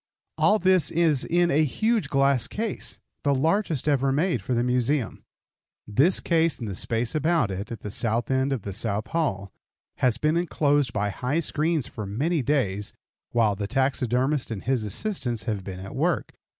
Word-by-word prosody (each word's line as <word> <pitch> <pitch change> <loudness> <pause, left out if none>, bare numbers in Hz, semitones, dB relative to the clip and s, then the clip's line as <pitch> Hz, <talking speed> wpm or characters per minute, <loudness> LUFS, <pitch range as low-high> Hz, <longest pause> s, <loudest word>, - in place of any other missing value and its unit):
All 210 - +5
this 185 -6 +3
is 160 -5 +2
in 175 0 +2
a 150 +3 +4
huge 220 - 0
glass 135 -3 +3
case, 220 0 -4 0.2
the 140 -1 +2
largest 160 - 0
ever 140 -2 +2
made 150 - +1
for 125 +6 -2
the 120 - +1
Museum. 125 0 0 0.6
This 140 - +3
case 165 -2 +1
and 115 - -5
the 100 - -4
space 115 +5 -1
about 155 - +1
it, 100 +4 -5
at 115 - -6
the 105 - -6
south 115 +2 0
end 130 +1 +1
of 130 -7 -2
the 100 - -5
south 105 0 -1
hall, 100 - -1 0.5
has 125 -3 +2
been 155 +5 +1
inclosed 145 -6 +1
by 105 -2 -1
high 130 +9 -1
screens 155 -3 0
for 105 -2 -6
many 145 - 0
days 105 -8 0 0.4
while 110 -4 +2
the 100 0 -3
taxidermist 130 +1 0
and 110 -4 -5
his 125 -4 0
assistants 120 - -2
have 105 -3 -3
been 95 -1 -7
at 95 +1 -8
work. - - 0
130 Hz, 175 wpm, -25 LUFS, 110-155 Hz, 0.6 s, All